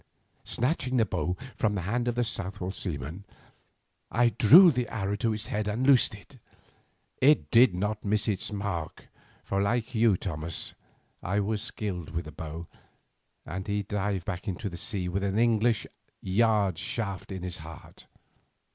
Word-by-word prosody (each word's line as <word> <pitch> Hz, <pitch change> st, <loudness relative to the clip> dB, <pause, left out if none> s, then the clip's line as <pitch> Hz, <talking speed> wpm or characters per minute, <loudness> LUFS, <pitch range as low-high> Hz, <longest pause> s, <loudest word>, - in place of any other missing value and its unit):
Snatching 130 Hz, 0 st, 0 dB
the 115 Hz, -, +4 dB
bow 90 Hz, -2 st, -2 dB, 0.2 s
from 105 Hz, -2 st, +1 dB
the 95 Hz, -, -1 dB
hand 120 Hz, +7 st, -1 dB
of 120 Hz, -, 0 dB
the 120 Hz, -, +2 dB
Southwold 95 Hz, -3 st, -4 dB
seaman, 85 Hz, +1 st, -5 dB, 0.9 s
I 120 Hz, +1 st, +3 dB
drew 150 Hz, -, +8 dB
the 125 Hz, -3 st, -1 dB
arrow 100 Hz, -2 st, -2 dB
to 115 Hz, +1 st, +1 dB
its 105 Hz, 0 st, -1 dB
head 105 Hz, 0 st, -2 dB
and 110 Hz, +5 st, -1 dB
loosed. 130 Hz, -2 st, +2 dB, 0.8 s
It 145 Hz, +3 st, +4 dB
did 115 Hz, -5 st, +6 dB
not 105 Hz, +3 st, -2 dB
miss 105 Hz, +2 st, 0 dB
its 105 Hz, -1 st, -1 dB
mark, 100 Hz, -6 st, -4 dB, 0.3 s
for 100 Hz, 0 st, -1 dB
like 115 Hz, +4 st, 0 dB
you, 110 Hz, -4 st, +4 dB
Thomas, 80 Hz, -3 st, -4 dB, 0.5 s
I 100 Hz, +3 st, 0 dB
was 105 Hz, +1 st, -1 dB
skilled 90 Hz, -7 st, -4 dB
with 80 Hz, 0 st, -4 dB
the 75 Hz, -, -8 dB
bow, 80 Hz, +3 st, -7 dB, 0.8 s
and 95 Hz, +2 st, -5 dB
he 105 Hz, 0 st, -1 dB
dived 100 Hz, -2 st, -2 dB
back 95 Hz, 0 st, -5 dB
into 100 Hz, +2 st, -3 dB
the 85 Hz, -, -8 dB
sea 90 Hz, 0 st, -2 dB
with 95 Hz, +2 st, -2 dB
an 100 Hz, +1 st, 0 dB
English 115 Hz, 0 st, +2 dB, 0.3 s
yard 100 Hz, -2 st, +2 dB
shaft 100 Hz, -4 st, -4 dB
in 95 Hz, -2 st, -5 dB
his 90 Hz, -1 st, -4 dB
heart. 80 Hz, 0 st, -12 dB
105 Hz, 160 wpm, -28 LUFS, 90-115 Hz, 0.9 s, drew